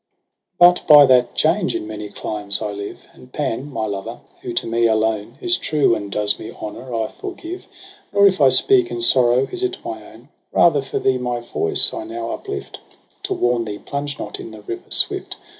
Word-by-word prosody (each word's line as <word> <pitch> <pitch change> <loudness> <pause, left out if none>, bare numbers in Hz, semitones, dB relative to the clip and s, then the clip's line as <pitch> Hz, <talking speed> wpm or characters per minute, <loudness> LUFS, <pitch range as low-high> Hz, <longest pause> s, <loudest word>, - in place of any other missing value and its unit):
' - - -60
But 175 0 +6
by 150 -2 +9
that 125 -2 +3
change 175 +4 +1
in - - -3
many 105 -1 -7
climes 100 -1 -2
I 105 - -3
live 100 0 -8
j - - -25
And 125 - -17
Pan, 145 0 -3
my 110 -4 -3
lover, 100 -2 -6 0.2
who - - -5
to - - -1
me 115 0 +1
alone 110 -1 -1
Is 355 -1 +2
true 150 -6 +1
and 100 -3 -4
does 105 0 0
me 110 - -8
honour, 120 +3 -8
I 115 -2 -1
forgive 365 -2 -8 0.2
— - - -25
Nor 200 0 +4
if 190 -4 +3
I 135 - +7
speak 370 - +3
in 360 - -4
sorrow 130 - +4
is't 375 0 -3
my 110 -1 -6
own: 120 +5 -18 0.2
Rather 150 -4 +4
for 135 - -5
thee 130 -1 +1
my 125 -1 -2
voice 120 -8 +2
I - - -5
now 115 0 -5
uplift - - -7 0.5
To - - -2
warn 120 -1 +1
thee 105 -1 -5
plunge 140 +3 -5
not - - -6
in - - -8
the 110 -1 -12
river 115 - -7
swift. - - +2
120 Hz, 210 wpm, -20 LUFS, 110-150 Hz, 0.5 s, by